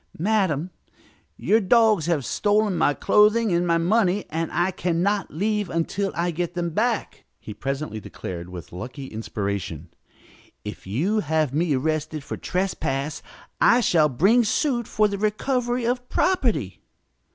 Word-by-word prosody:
"Madam, 185 Hz, -4 st, 0 dB, 0.7 s
your 220 Hz, -, +3 dB
dogs 215 Hz, -4 st, +4 dB
have 155 Hz, -7 st, 0 dB
stolen 210 Hz, -, +1 dB
my 145 Hz, -, +3 dB
clothing 210 Hz, +7 st, +3 dB
and 175 Hz, +1 st, +1 dB
my 170 Hz, 0 st, +3 dB
money, 195 Hz, +2 st, +2 dB
and 165 Hz, +1 st, -2 dB
I 175 Hz, +2 st, +1 dB
can 170 Hz, -1 st, -1 dB
not 200 Hz, -1 st, 0 dB
leave 205 Hz, +3 st, -1 dB
until 185 Hz, +4 st, -1 dB
I 175 Hz, +1 st, 0 dB
get 175 Hz, +1 st, -3 dB
them 170 Hz, -1 st, -2 dB
back," 225 Hz, +6 st, -1 dB, 0.2 s
he 105 Hz, -, -8 dB
presently 135 Hz, -3 st, -4 dB
declared 90 Hz, -3 st, -7 dB
with 90 Hz, -4 st, -9 dB
lucky 125 Hz, +10 st, -7 dB
inspiration. 100 Hz, -, -4 dB, 0.8 s
"If -, -, -8 dB
you 170 Hz, -, 0 dB
have 155 Hz, -5 st, 0 dB
me 155 Hz, -1 st, +1 dB
arrested 155 Hz, +2 st, -2 dB
for -, -, -5 dB
trespass 160 Hz, -6 st, -2 dB, 0.4 s
I -, -, +6 dB
shall 165 Hz, -9 st, +3 dB
bring 195 Hz, -, +4 dB
suit 240 Hz, +1 st, 0 dB
for 215 Hz, 0 st, +2 dB
the 200 Hz, -1 st, -4 dB
recovery 240 Hz, +3 st, 0 dB
of 250 Hz, +1 st, -2 dB
property." 220 Hz, -, 0 dB
175 Hz, 145 wpm, -24 LUFS, 145-215 Hz, 0.8 s, I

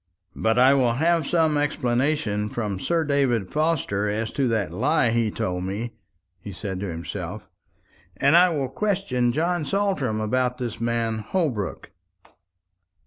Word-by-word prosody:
"But 110 Hz, +1 st, +1 dB
I 130 Hz, +2 st, +6 dB
will 125 Hz, -4 st, +3 dB
have 160 Hz, +3 st, +1 dB
some 160 Hz, -3 st, +2 dB
explanation 125 Hz, -6 st, 0 dB
from 105 Hz, -5 st, -3 dB
Sir 165 Hz, -, 0 dB
David 135 Hz, -9 st, +1 dB
Forster 150 Hz, -10 st, 0 dB
as 110 Hz, +2 st, -2 dB
to 135 Hz, -2 st, 0 dB
that 110 Hz, -7 st, 0 dB
lie 130 Hz, -, +2 dB
he 115 Hz, -1 st, +1 dB
told 90 Hz, -3 st, -3 dB
me," 105 Hz, +5 st, -4 dB, 0.5 s
he 100 Hz, -, -8 dB
said 95 Hz, 0 st, -5 dB
to 100 Hz, -, -3 dB
himself; 85 Hz, +1 st, -6 dB, 0.7 s
"and 140 Hz, +7 st, +4 dB
I 180 Hz, +1 st, +7 dB
will 145 Hz, -5 st, -1 dB
question 175 Hz, -10 st, 0 dB
John 170 Hz, +5 st, 0 dB
Saltram 150 Hz, -, 0 dB
about 125 Hz, +3 st, 0 dB
this 120 Hz, -3 st, -5 dB
man 115 Hz, -1 st, 0 dB
Holbrook." 115 Hz, -, -2 dB
125 Hz, 140 wpm, -24 LUFS, 110-150 Hz, 0.7 s, I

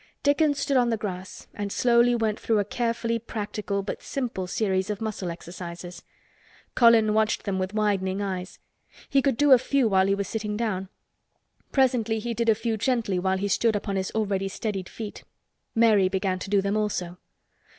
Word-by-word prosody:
Dickon 290 Hz, +1 st, +3 dB
stood 280 Hz, -1 st, 0 dB
up -, -, +6 dB
on 240 Hz, -, +1 dB
the 225 Hz, -, 0 dB
grass 190 Hz, -3 st, -6 dB
and 205 Hz, -1 st, -4 dB
slowly 240 Hz, +1 st, +4 dB
went 220 Hz, -2 st, 0 dB
through 225 Hz, -, +1 dB
a 205 Hz, -, +1 dB
carefully 230 Hz, +1 st, -1 dB
practical 210 Hz, -2 st, -4 dB
but 195 Hz, -, -5 dB
simple 240 Hz, -9 st, -3 dB
series 190 Hz, 0 st, 0 dB
of 210 Hz, -1 st, -2 dB
muscle 215 Hz, -5 st, -3 dB
exercises. 175 Hz, +1 st, -8 dB, 0.7 s
Colin 230 Hz, -3 st, +5 dB
watched 215 Hz, 0 st, +1 dB
them 195 Hz, -2 st, -2 dB
with 185 Hz, +2 st, -3 dB
widening 200 Hz, -3 st, 0 dB
eyes. 190 Hz, -2 st, -4 dB, 0.5 s
He 275 Hz, -, +4 dB
could 270 Hz, -3 st, +1 dB
do 290 Hz, +1 st, +4 dB
a 260 Hz, -, +9 dB
few 265 Hz, 0 st, +1 dB
while 190 Hz, -2 st, +3 dB
he 195 Hz, -, +2 dB
was 200 Hz, -1 st, -3 dB
sitting 210 Hz, -1 st, -3 dB
down. 195 Hz, -5 st, -2 dB, 0.8 s
Presently 245 Hz, -5 st, +2 dB
he 235 Hz, +2 st, -3 dB
did 230 Hz, 0 st, 0 dB
a 220 Hz, -, +5 dB
few 225 Hz, 0 st, -2 dB
gently 225 Hz, -5 st, 0 dB
while 190 Hz, +1 st, +1 dB
he 200 Hz, +2 st, -1 dB
stood 220 Hz, +3 st, +2 dB
upon 200 Hz, -1 st, -2 dB
his 190 Hz, -1 st, -1 dB
already 200 Hz, -3 st, 0 dB
steadied 195 Hz, -1 st, -4 dB
feet. 215 Hz, -2 st, -8 dB, 0.5 s
Mary 215 Hz, -5 st, +4 dB
began 190 Hz, -1 st, -1 dB
to 195 Hz, -, -6 dB
do 200 Hz, -1 st, +2 dB
them 200 Hz, +1 st, 0 dB
also. 185 Hz, -5 st, -2 dB
210 Hz, 185 wpm, -26 LUFS, 190-230 Hz, 0.8 s, a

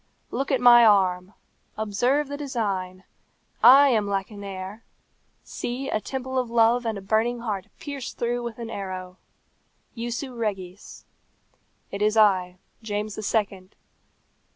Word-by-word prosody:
Look 275 Hz, -, -2 dB
at 265 Hz, -, +2 dB
my 240 Hz, -1 st, +8 dB
arm! 190 Hz, -3 st, +3 dB, 0.4 s
Observe 245 Hz, +7 st, 0 dB
the 285 Hz, -, -5 dB
design! 200 Hz, -10 st, -3 dB, 0.6 s
I 275 Hz, +3 st, +8 dB
am 215 Hz, -5 st, +1 dB
Lacenaire! 200 Hz, +1 st, -5 dB, 0.6 s
See, 255 Hz, +3 st, -5 dB
a 215 Hz, -, 0 dB
temple 260 Hz, +1 st, -3 dB
of 250 Hz, -2 st, -3 dB
love 235 Hz, +1 st, +3 dB
and 220 Hz, -2 st, -2 dB
a -, -, -7 dB
burning 225 Hz, +4 st, 0 dB
heart 210 Hz, -4 st, -4 dB
pierced 280 Hz, -4 st, -7 dB
through 240 Hz, +1 st, -1 dB
with 235 Hz, -2 st, -6 dB
an 230 Hz, -1 st, -7 dB
arrow! 185 Hz, -2 st, -6 dB, 0.8 s
Jussu 240 Hz, +3 st, -4 dB
regis. 195 Hz, -4 st, -5 dB, 0.9 s
It 200 Hz, -, -5 dB
is 215 Hz, +1 st, +2 dB
I, 185 Hz, -4 st, +3 dB, 0.2 s
James 210 Hz, -1 st, -3 dB
the 215 Hz, -, -6 dB
Second. 200 Hz, -3 st, -2 dB
220 Hz, 130 wpm, -25 LUFS, 195-245 Hz, 0.9 s, my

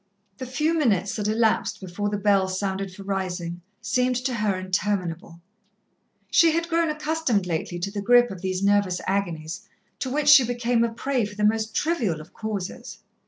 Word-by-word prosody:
The 255 Hz, -, -5 dB
few 300 Hz, +6 st, 0 dB
minutes 210 Hz, -, +1 dB
that 210 Hz, -1 st, -1 dB
elapsed 220 Hz, 0 st, +1 dB
before 195 Hz, +2 st, -3 dB
the 205 Hz, -, -2 dB
bell 200 Hz, -1 st, +3 dB
sounded 190 Hz, 0 st, -3 dB
for 195 Hz, +2 st, -11 dB
rising, 180 Hz, -3 st, -3 dB, 0.2 s
seemed 250 Hz, +4 st, +1 dB
to 250 Hz, +1 st, -1 dB
her 210 Hz, -4 st, 0 dB
interminable. 185 Hz, -3 st, -2 dB, 0.9 s
She 330 Hz, -2 st, +5 dB
had 335 Hz, +1 st, -1 dB
grown 335 Hz, -1 st, +2 dB
accustomed 305 Hz, -, 0 dB
lately 175 Hz, 0 st, -3 dB
to 175 Hz, +3 st, -3 dB
the 205 Hz, 0 st, -4 dB
grip 245 Hz, +3 st, +5 dB
of 185 Hz, -3 st, -8 dB
these 185 Hz, 0 st, -2 dB
nervous 200 Hz, -2 st, +2 dB
agonies, 175 Hz, -3 st, -3 dB, 0.3 s
to 260 Hz, -, -2 dB
which 290 Hz, +2 st, +1 dB
she 290 Hz, -3 st, +9 dB
became 240 Hz, 0 st, +1 dB
a 235 Hz, -, +1 dB
prey 250 Hz, +2 st, -1 dB
for 205 Hz, 0 st, -9 dB
the 210 Hz, -, -3 dB
most 220 Hz, +1 st, 0 dB
trivial 240 Hz, -, 0 dB
of 155 Hz, -, -13 dB
causes. 210 Hz, -3 st, -5 dB
205 Hz, 175 wpm, -24 LUFS, 185-245 Hz, 0.9 s, she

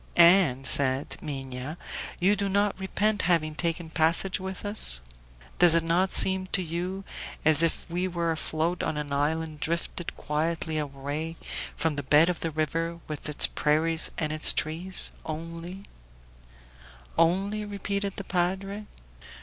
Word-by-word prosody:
"And," 170 Hz, -7 st, +6 dB
said 135 Hz, -1 st, +2 dB
Minha, 135 Hz, 0 st, -5 dB, 0.4 s
"you 190 Hz, +3 st, +4 dB
do 200 Hz, 0 st, -1 dB
not 200 Hz, 0 st, +1 dB
repent 205 Hz, +2 st, 0 dB
having 155 Hz, -3 st, +2 dB
taken 165 Hz, 0 st, -2 dB
passage 165 Hz, +5 st, +3 dB
with 190 Hz, +1 st, -6 dB
us? 205 Hz, -, +1 dB, 0.6 s
Does 175 Hz, -2 st, +7 dB
it 165 Hz, -, +3 dB
not 175 Hz, +3 st, +1 dB
seem 190 Hz, 0 st, +3 dB
to 185 Hz, -, +2 dB
you 180 Hz, +4 st, -4 dB, 0.4 s
as 155 Hz, 0 st, +6 dB
if 165 Hz, -1 st, 0 dB
we 180 Hz, +2 st, -1 dB
were 170 Hz, -2 st, -1 dB
afloat 160 Hz, +2 st, -2 dB
on 160 Hz, -2 st, -2 dB
an 145 Hz, -1 st, -4 dB
island 155 Hz, +2 st, -1 dB
drifted 170 Hz, +2 st, -3 dB
quietly 160 Hz, +1 st, -2 dB
away 145 Hz, +3 st, -4 dB, 0.4 s
from 160 Hz, -3 st, 0 dB
the -, -, -1 dB
bed 150 Hz, +5 st, +5 dB
of 175 Hz, -, -2 dB
the 165 Hz, -, -2 dB
river 165 Hz, +2 st, -2 dB
with 150 Hz, 0 st, -6 dB
its 150 Hz, -, +6 dB
prairies 160 Hz, +2 st, +2 dB
and 155 Hz, -1 st, -1 dB
its 155 Hz, -, +4 dB
trees? 170 Hz, +4 st, 0 dB
Only 165 Hz, +4 st, -7 dB, 0.7 s
" -, -, -25 dB, 0.5 s
"Only?" 195 Hz, +6 st, +1 dB
repeated 200 Hz, -1 st, -3 dB
the 200 Hz, -, -5 dB
padre. 195 Hz, +3 st, -2 dB
165 Hz, 145 wpm, -27 LUFS, 155-185 Hz, 0.7 s, Does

